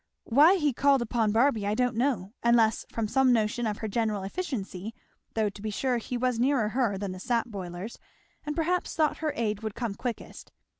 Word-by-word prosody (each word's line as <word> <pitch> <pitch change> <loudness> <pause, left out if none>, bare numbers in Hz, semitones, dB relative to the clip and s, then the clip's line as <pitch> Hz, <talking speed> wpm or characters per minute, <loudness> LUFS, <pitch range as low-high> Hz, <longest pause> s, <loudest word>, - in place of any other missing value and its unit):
Why 295 +10 +6
he 300 -7 +1
called 275 0 +3
upon 225 -2 0
Barby 225 -2 +2
I 210 - +1
don't 250 -1 +1
know, 230 -6 0
unless 230 -2 +3
from 225 -2 -2
some 265 +3 +3
notion 230 0 +1
of 210 -1 -2
her 220 - -4
general 215 -2 -1
efficiency, 220 - -5 0.4
though 220 -1 +2
to 200 - -12
be 215 - -3
sure 245 +3 0
he 245 +2 -4
was 250 -1 0
nearer 250 -4 +2
her 230 -4 0
than 195 -1 -4
the 185 - -7
sap 235 +4 0
boilers 190 +1 -7 0.4
and 300 0 -4
perhaps 350 +2 0
thought 310 -2 +2
her 315 -2 -1
aid 215 -3 -1
would 220 -1 -4
come 235 -3 -3
quickest. 240 +3 -6
230 Hz, 200 wpm, -28 LUFS, 210-260 Hz, 0.4 s, Why